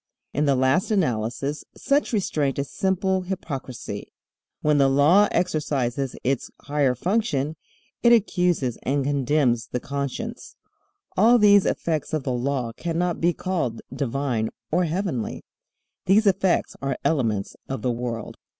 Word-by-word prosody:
In 145 +2 +1
the 140 -2 +3
last 130 +8 +2
analysis 135 - -1
such 285 +1 +1
restraint 155 - 0
is 140 0 -3
simple 190 0 0
hypocrisy. 135 - -6 0.5
When 150 -1 +3
the 135 -1 +5
Law 155 +10 +5
exercises 140 -6 -1
its 135 0 -1
higher 140 -3 +1
function 160 - 0 0.5
it 235 - +5
accuses 180 - +2
and 140 +1 0
condemns 135 -3 +1
the 125 - -3
conscience. 140 +1 -5 0.6
All 230 +5 +6
these 205 -3 +6
effects 160 -2 -1
of 155 -3 0
the 130 - -1
Law 125 -1 -1
cannot 170 +5 -2
be 170 +1 +4
called 165 -10 -3
divine 130 -4 -1 0.2
or 175 +3 +2
heavenly. 165 - -2 0.6
These 205 +4 +5
effects 190 -2 +2
are 135 -2 -2
elements 115 -10 0
of 135 - -4
the 125 - +1
world. 120 -2 -4
145 Hz, 130 wpm, -24 LUFS, 130-180 Hz, 0.6 s, All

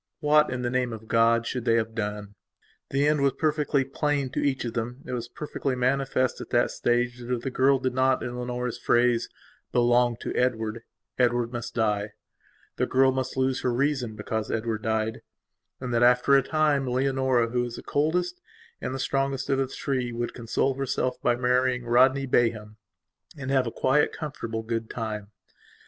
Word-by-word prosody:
What, 150 0 +4
in 125 -1 -3
the 120 - -1
name 125 -2 0
of 110 0 -9
God, 115 +1 +3
should 125 -1 -3
they 115 -1 +3
have 110 -1 0
done? 105 -2 -4 0.6
The 140 +2 +2
end 150 -1 +2
was 140 -2 +3
perfectly 150 -3 +1
plain 140 -1 -1
to - - -2
each 135 -3 0
of 115 - -4
themit 120 +3 -5
was 120 -1 -3
perfectly 135 0 -3
manifest 130 0 0
at - - -8
this 120 0 +2
stage 120 0 0
that, 120 0 -7
if 120 -1 -1
the 135 - -3
girl 135 +2 +3
did 130 -1 -2
not, 130 0 +2
in 120 - -4
Leonora's 125 0 -3
phrase, 120 -1 +2 0.4
"belong 120 -1 +3
to - - -4
Edward," 115 -2 0 0.4
Edward 120 -1 +2
must 120 0 -5
die, 105 -2 0 0.6
the - - +1
girl 130 0 +4
must 130 0 -3
lose 130 0 +1
her 125 - 0
reason 125 -3 0
because 110 0 -3
Edward 110 -1 -2
diedand, 110 0 -1 0.6
that 125 -2 -1
after 125 +3 +5
a 135 - +6
time, 150 -1 +1
Leonora, 130 -2 +1
who 125 +1 0
was 120 -1 -4
the - - -9
coldest 175 - 0 0.4
and 130 - -3
the - - -4
strongest 135 +1 -1
of 135 - +2
the 135 - +1
three, 130 -2 -2
would 120 0 -3
console 120 +3 0
herself 130 -1 -2
by 120 - +2
marrying 125 0 +1
Rodney 130 +3 +4
Bayham 110 -4 0 0.6
and 135 -1 -4
have 130 -2 +2
a - - -3
quiet, 135 +5 +2
comfortable, 115 -7 -5
good 115 0 -3
time. 110 -3 -4
125 Hz, 180 wpm, -26 LUFS, 115-135 Hz, 0.6 s, a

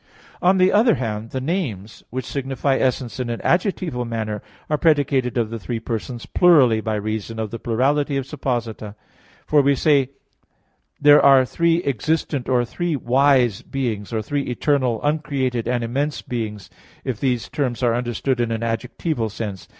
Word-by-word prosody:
On 185 +2 +4
the 185 0 +4
other 225 +2 +5
hand, 110 -2 -4
the 130 - -3
names 130 - -3
which 130 +1 -4
signify 135 0 -1
essence 130 -1 -1
in 125 -2 -2
an 115 - -3
adjectival 175 - 0
manner 110 -3 -3 0.3
are 150 -1 0
predicated 140 -5 +2
of 115 -2 0
the 115 - -4
three 115 +3 -4
persons 115 +1 -5
plurally, 130 -11 +4
by 110 -1 -1
reason 110 +1 -4
of 110 -2 -3
the 115 - -5
plurality 140 +5 +1
of 135 - -2
supposita. 120 -7 -4 0.5
For 150 -1 +4
we 140 0 +3
say 140 -2 +3 0.9
there 145 0 +7
are 135 -2 +7
three 170 +5 +1
"existent" 140 +1 -1
or 125 -1 +2
three 175 +6 -2
"wise" 130 -3 +3
beings, 115 -7 -3
or 110 -2 -2
three 145 +6 -1
"eternal," 125 -2 0
"uncreated," 140 -5 -1
and 120 -1 0
"immense" 140 +6 -2
beings, 105 -6 -5 0.3
if 125 -5 -3
these 125 -3 0
terms 130 -4 -2
are 120 -2 +3
understood 120 +2 -1
in 120 -1 0
an 115 0 -2
adjectival 115 +2 -2
sense. 100 -3 -6
125 Hz, 165 wpm, -21 LUFS, 115-145 Hz, 0.9 s, there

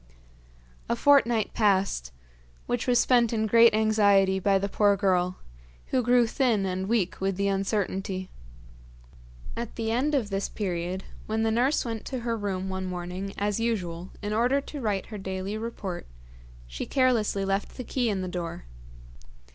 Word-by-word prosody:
A - - +2
fortnight 235 -5 +3
passed, 195 - +1 0.5
which 245 0 -2
was 245 -1 +4
spent 240 -1 +4
in 220 -2 0
great 230 +1 +6
anxiety 200 -3 +3
by 195 +1 +3
the 195 +1 -1
poor 205 0 +3
girl, 185 -2 +1 0.5
who 255 - +2
grew 245 0 +4
thin 225 -4 +1
and 190 0 -2
weak 215 -7 0
with 195 -1 0
the 200 0 +1
uncertainty. 195 -1 -2 1.2
At 235 -1 -5
the 225 -1 -2
end 275 +6 +1
of 225 -7 -1
this 195 0 -1
period, 185 -2 -3 0.2
when 220 +1 0
the 225 - +2
nurse 255 +7 +2
went 225 -2 -4
to 260 -3 -4
her 230 -1 -1
room 195 -3 -3
one 190 0 -3
morning 180 +2 -5
as 205 +1 -1
usual 185 -6 -2
in 205 +1 -2
order 245 +5 +2
to 285 +1 -7
write 205 -4 -1
her 210 -2 -8
daily 190 +1 -4
report, 215 - -5 0.6
she - - -6
carelessly 230 -7 +2
left 195 +1 -2
the 255 - -4
key 245 0 -1
in 195 -3 -1
the - - -3
door. 175 - -5
205 Hz, 165 wpm, -27 LUFS, 190-230 Hz, 1.2 s, great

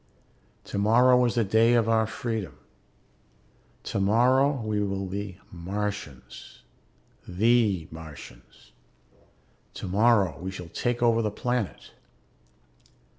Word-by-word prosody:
Tomorrow 125 +5 +3
is 120 - -1
the 115 - +2
day 110 +4 +3
of 115 -2 +2
our 110 -1 +2
freedom. 110 - -5 1.3
Tomorrow 125 +8 +2
we 110 -1 -1
will 100 -1 -2
be 100 0 -6
Martians, 95 -5 -6 0.6
the 100 -3 +2
Martians. 80 -3 -13 1.0
Tomorrow 100 -1 +2
we 90 +2 -5
shall 90 -3 -8
take 120 +6 -2
over 115 -1 +3
the 110 - 0
planet. 120 0 -3
105 Hz, 95 wpm, -26 LUFS, 95-120 Hz, 1.3 s, Tomorrow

